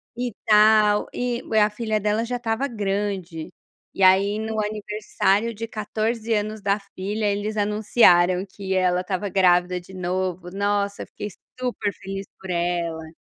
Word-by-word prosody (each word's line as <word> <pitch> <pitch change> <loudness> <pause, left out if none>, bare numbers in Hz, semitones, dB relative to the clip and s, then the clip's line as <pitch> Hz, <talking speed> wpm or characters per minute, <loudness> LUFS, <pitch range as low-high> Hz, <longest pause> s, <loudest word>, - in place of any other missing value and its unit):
e 245 0 -2
tal 210 -1 +5
e 245 -1 -2 0.2
a 210 - +4
filha 215 0 -1
dela 210 +2 0
já 245 +1 -3
estava 240 +3 -1
grande, 195 - -3 0.4
e 195 - 0
aí 195 +3 +5
no 220 0 -2
aniversário 210 +1 -1
de 230 +2 -5
14 220 +1 -3
anos 215 +1 -2
da 200 +1 +1
filha 200 +2 -4
eles 205 +1 -1
anunciaram 200 -3 +4
que 190 0 -4
ela 180 -1 +2
estava 185 +2 -3
grávida 180 -1 +3
de 175 - -16
novo, 180 -1 -3
nossa 200 0 -1
eu - - -7
fiquei 210 - -6 0.3
super 245 -5 -1
feliz 195 +1 -6
por 190 - -10
ela. 170 -2 -2
205 Hz, 150 wpm, -23 LUFS, 185-215 Hz, 0.4 s, tal